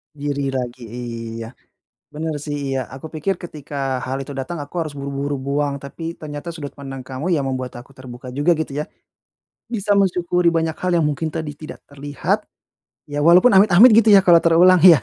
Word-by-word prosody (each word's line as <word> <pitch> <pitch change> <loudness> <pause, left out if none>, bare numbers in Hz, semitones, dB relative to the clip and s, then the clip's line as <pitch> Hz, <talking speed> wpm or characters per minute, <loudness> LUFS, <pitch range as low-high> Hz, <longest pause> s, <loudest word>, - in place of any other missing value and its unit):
Diri 145 -1 -2
lagi, 125 -1 -4
iya. 115 -1 -6 0.6
Benar 160 0 -3
sih, 145 -1 -4 0.2
iya. - - 0 0.2
Aku 135 +4 -9
pikir 175 +5 -1
ketika 150 -5 -10 0.3
hal 135 +1 -3
itu 140 +1 -8
datang 165 +6 -5
aku 145 +4 -12
harus 155 -2 -6
buru-buru 140 +1 -3
buang, 140 0 0
tapi 165 +4 -6
ternyata 150 +2 -7
sudut 145 -4 -7
pandang 135 -2 -7
kamu 135 +4 -5
ya 150 - +1
membuat 130 -1 -3
aku 120 - -13
terbuka 125 0 -10
juga 150 +4 +2
gitu 160 -3 -3
ya. - - -2 0.8
Bisa 210 -3 -2
mensyukuri 180 -2 +1
banyak 165 -1 -1
hal 185 0 -1
yang 155 - +2
mungkin 155 +3 -2
tadi 155 -2 -3
tidak 155 +1 -10
terlihat, 145 0 -3 0.6
ya 145 - -3
walaupun 180 +8 +7
amit-amit 200 +4 +7
gitu 225 - +1
ya 195 - +8
kalau 170 -2 +8
terulang 175 +2 +6
ya. 170 -6 +9
145 Hz, 180 wpm, -20 LUFS, 135-170 Hz, 0.8 s, ya